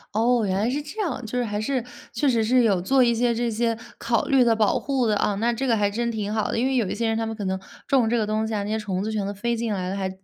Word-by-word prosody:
哦， 235 +1 +3
原 190 -1 0
来 220 +4 +1
是 290 +3 -1
这 300 +9 -9
样。 265 - -3
就 250 +3 -4
是 245 - 0
还 210 -1 -3
是 255 +1 -1 0.3
确 235 +5 0
实 230 -4 +3
是 250 +2 +3
有 195 -5 +2
做 265 +8 +3
一 235 -1 +3
些 240 0 +2
这 235 +1 -1
些 230 0 0 0.2
考 230 -1 0
虑 270 -3 +4
的 230 -1 +4
保 215 -2 +2
护 265 -4 0
的 210 - +2
啊， 205 0 +1
那 235 +3 +1
这 265 +4 -2
个 230 -3 +2
还 205 -1 +2
真 235 +3 -1
挺 210 -1 -3
好 215 -1 0
的， - - -1
因 250 - +1
为 265 0 +1
有 230 -6 +1
一 - - -2
些 230 -1 -1
人 225 0 0
他 225 - -1
们 225 - -3
可 205 -2 -5
能 190 0 -1 0.3
种 255 -6 +3
这 240 - +1
个 215 - +1
东 215 +1 0
西 220 - -4
啊， 205 -1 -1
那 205 - -5
些 220 - 0
虫 195 -3 -3
子 220 - -2
全 210 -2 -1
都 200 - -3
飞 235 +4 -1
进 225 -2 -2
来 185 -1 -3
了， 195 - -3
还 190 -1 -2
225 Hz, 355 characters per minute, -24 LUFS, 210-240 Hz, 0.3 s, 虑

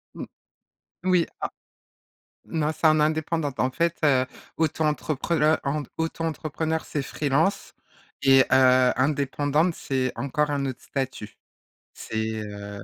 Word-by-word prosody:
M - - -6 0.8
oui, 180 -2 +3
à - - -1 1.0
non 155 -1 -1
c'est 155 +1 0
en 155 0 +5
indépendante. 155 -2 0
En 130 - +2
fait, 170 +4 0
heu, 130 -3 +4 0.3
auto-entreprel 155 0 0
heu, 155 +1 +5
en 145 +2 -1
auto-entrepreneur 160 0 -2
c'est 145 - -3
free-lance 150 +7 0 0.5
et 135 -1 +6
heu, 130 -1 +5
indépendante 145 +4 +1
c'est 130 -2 -2
encore 145 +2 0
un 140 -1 -1
autre 130 -2 -6
statut. 130 -6 -5 0.6
C'est, 110 0 -3
heu 105 0 -8
145 Hz, 120 wpm, -25 LUFS, 130-160 Hz, 1.0 s, et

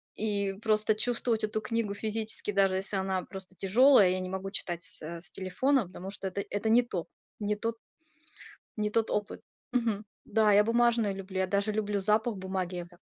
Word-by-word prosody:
и 200 -2 -1
просто 215 -1 +2
чувствовать 235 -1 0
эту 215 0 -1
книгу 220 -2 -1
физически, 215 +1 -3
даже 195 -1 +3
если 195 +1 -3
она 190 -1 -1
просто 190 -1 -10
тяжёлая. 215 +1 +6
Я 185 0 0
не 185 - -4
могу 190 +1 -4
читать 175 -4 -3
с, - - -4
э, 165 +2 -6
с 175 - -8
телефона, 225 +5 +1
потому 185 +1 -8
что 195 -1 -5
это, 200 +1 -3
это 205 +2 -1
не 240 +2 +6
то, 185 -8 -4 0.3
не 210 0 0
тот 230 +2 -3 1.0
не 210 0 0
тот 225 +1 +1
опыт. 210 0 -2 0.3
Мгм. 225 -4 0 0.2
Да, 215 -1 +3
я 205 +1 +6
бумажные 230 -3 +3
люблю. 190 0 -6
Я 190 - +2
даже 200 +2 0
люблю 205 -1 -1
запах 215 +2 +1
бумаги. 190 -1 -3
Я 175 - -3
вот 175 - -13
так 175 - -20
205 Hz, 195 wpm, -30 LUFS, 190-220 Hz, 1.0 s, тяжёлая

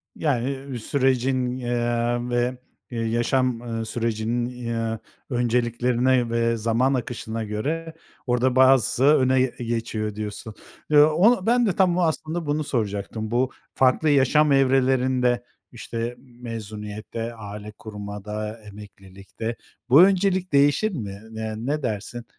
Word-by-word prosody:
Yani, 135 -2 -2
sürecin, 130 0 0
eee, 120 -1 0
ve, 120 +1 0 0.4
ııı, 115 - -2
yaşam, 120 +1 +1
ııı, 115 -2 -4
sürecinin, 120 +2 -2
ııı, 115 -1 -2 0.3
önceliklerine 120 0 +1
ve 115 0 +1
zaman 115 +4 +1
akışına 115 -3 -3
göre 150 +11 -3 0.3
orada 125 +1 +1
bazısı 130 -1 +4
öne 130 -3 +4
geçiyor 115 -4 -2
diyorsun. 105 +1 -6 0.4
Ya, 150 +1 +6
o 200 +4 +4
ben 240 +1 +3
de 195 -5 0
tam 180 -2 +3
o - - +2
aslında 160 0 -1
bunu 150 +1 0
soracaktım. 110 -3 -3
Bu 125 +2 +1 0.2
farklı 135 +4 +3
yaşam 145 +2 +4
evrelerinde, 130 -2 +2 0.3
işte, 120 0 -5
mezuniyette, 115 -2 -7
aile 105 -1 -8
kurmada, 105 +1 -6
emeklilikte, 100 +2 -8 0.3
bu 140 +6 +8
öncelik 190 -2 +2
değişir 145 +10 +3
mi? 100 - -6
Eee, 110 0 -4
ne 140 +6 -2
dersin? 115 +1 -4
120 Hz, 120 wpm, -24 LUFS, 110-135 Hz, 0.4 s, bu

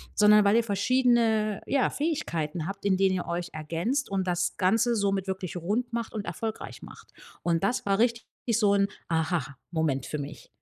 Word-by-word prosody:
sondern 210 0 +6
weil 200 +3 +5
ihr 235 - +3
verschiedene, 225 -1 +2
ja, 275 -2 +2
Fähigkeiten 175 - -2
habt, 195 - -6
in 190 -2 +3
denen 190 0 +3
ihr 180 - -3
euch 170 0 -3
ergänzt 170 - -2
und 195 -1 -1
das 175 0 0
Ganze 225 +6 +3
somit 195 -2 0
wirklich 190 -2 -4
rund 215 +8 -2
macht 235 -1 -3
und 210 -3 -4
erfolgreich 225 -1 -5
macht.“ - - -13 0.3
Und 170 0 +1
das 205 +4 0
war 195 +1 +1
richtig 235 -1 +1 0.3
so 205 -3 +4
'n 200 0 +3 0.2
Aha-Moment 160 -3 -1
für 150 - -4
mich. 145 +1 -8
195 Hz, 175 wpm, -27 LUFS, 175-225 Hz, 0.3 s, sondern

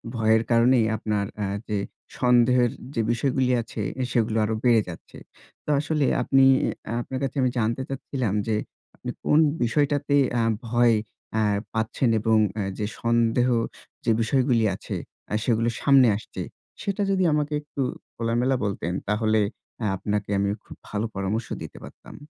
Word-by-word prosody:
ভয়ের 110 0 +3
কারণেই 115 0 +5
আপনার 105 -2 -1
অ্যা 105 - -2 0.2
যে 105 - -1 0.4
সন্দেহের 125 -1 +4 0.2
যে 115 - +2
বিষয়গুলী 130 +1 +1
আছে, 115 -1 -6 0.2
এ - - +1
সেগুলো 115 -1 +1
আরো 110 - -1
বেড়ে 120 -3 +5
যাচ্ছে। 85 - -11 0.5
তো - - -6
আসলে 150 -1 0 0.2
আপনি, 135 -1 +4 0.4
অ্যা 115 - -3
আপনার 130 +2 -5
কাছে 135 - -2
আমি 130 - +3
জানতে 115 +4 0
চাচ্ছিলাম 135 -5 -2
যে, 110 - +1 0.4
আপনি - - -7
কোন 150 - +4 0.2
বিষয়টাতে 145 +3 +1 0.2
আ - - +3 0.3
ভয় 120 0 +4 0.4
অ্যা 110 0 +1 0.3
পাচ্ছেন 110 +3 0
এবং 110 0 +3 0.2
অ্যা 105 - -1 0.2
যে 105 - 0 0.2
সন্দেহ 115 +1 +2 0.6
যে - - +3
বিষয়গুলি 120 -1 +2
আছে, - - -6 0.4
আ - - -2
সেগুলো 115 -1 +2
সামনে 135 -3 +6
আসছে। 105 - -8 0.4
সেটা 200 0 -2
যদি 190 -1 +2
আমাকে 150 0 0
একটু 145 -1 -6 0.3
খোলামেলা 120 +3 +1
বলতেন 90 -3 -2 0.2
তাহলে 110 +1 +2 0.4
অ্যা 110 - -1
আপনাকে 105 +1 -2
আমি 100 - +1 0.2
খুব - - -11
ভালো 105 +1 -2
পরামর্শ 100 +4 -2
দিতে - - -8
পারতাম। - - -12
115 Hz, 155 wpm, -25 LUFS, 110-130 Hz, 0.6 s, সামনে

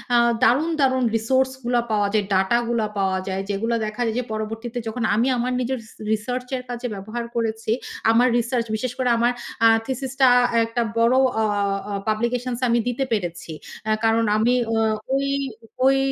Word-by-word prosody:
আ - - +6 0.3
দারুণ, 300 +8 +3
দারুণ 260 -1 +3
রিসোর্স 260 +4 +2
গুলা 240 -1 +2
পাওয়া 205 -1 +2
যায়, 210 -2 +2
ডাটা 190 +5 +3
গুলা 225 -3 0
পাওয়া 190 -1 +1
যায়, 190 0 -2
যেগুলা 225 +4 0
দেখা 215 +3 -5
যায় 225 - -1
যে - - -1
পরবর্তীতে 225 +2 -4
যখন 225 +1 -3
আমি 235 +4 +2
আমার 250 +1 -1
নিজের 255 +1 -1
রিস 220 - -16 0.2
রিসার্চের 250 +4 -2
কাজে 245 0 -4
ব্যবহার 215 +5 -5
করেছি, 225 -1 -1 0.4
আমার 245 +2 +4
রিসার্চ 240 0 0
বিশেষ 250 +2 -2
করে 255 -2 +1
আমার 240 +1 +3 0.3
আ - - +9 0.2
থিসিস 265 0 -3
টা 260 - +8 0.4
একটা 230 +1 -2 0.2
বড় 230 +2 +4 0.3
আ - - +2 0.5
আ - - -3
পাবলিকেশনস 240 +3 -1
আমি 235 +1 +3
দিতে 245 +2 0
পেরেছি। 175 -6 -3 0.3
অ্যা 215 - +2
কারণ 225 0 +3
আমি 240 +3 +3
অ্যা 225 0 +1 0.3
ওই, 275 0 0 0.6
ওই 270 0 +5
235 Hz, 175 wpm, -22 LUFS, 220-250 Hz, 0.6 s, আ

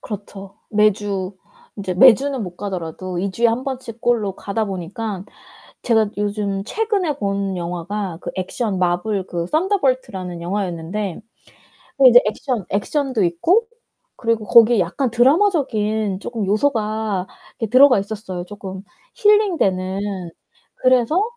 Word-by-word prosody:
그렇죠. 200 -1 -8
매주 205 -2 +1 0.4
인제 195 -3 -3
매주는 265 +5 +5
못 180 -3 -7
가더라도 185 -2 -5
2 195 +2 -1
주에 235 +5 +2
1 230 +2 0
번씩 250 -4 -6
꼴로 220 -6 +1
가다 215 +2 -2
보니까 195 +1 -5 0.6
제가 220 -3 +3
요즘 205 -1 -2
최근에 400 - -1
본 200 -4 -2
영화가 175 +2 -4
그 - - -5
액션 195 +2 -2
마블 185 +2 0
그 170 -1 -3
선더볼트라는 255 - -1
영화였는데 180 +1 -3 0.8
그 270 -2 +8
이제 245 0 +8
액션 220 0 -2
액션도 255 +3 0
있고 330 - +2 0.5
그리고 230 -2 -1
거기에 230 +1 +6
약간 210 +9 -1
드라마적인 235 - +2
쪼끔 225 -2 -4
요소가 215 -3 0 0.3
이렇게 225 - -2
들어가 255 -1 +7
있었어요, 195 -3 -5
쪼끔 190 -1 -8 0.3
힐링 415 -4 +3
되는. 190 -1 0 0.8
그래서 255 - +3
210 Hz, 285 characters per minute, -20 LUFS, 190-245 Hz, 0.8 s, 그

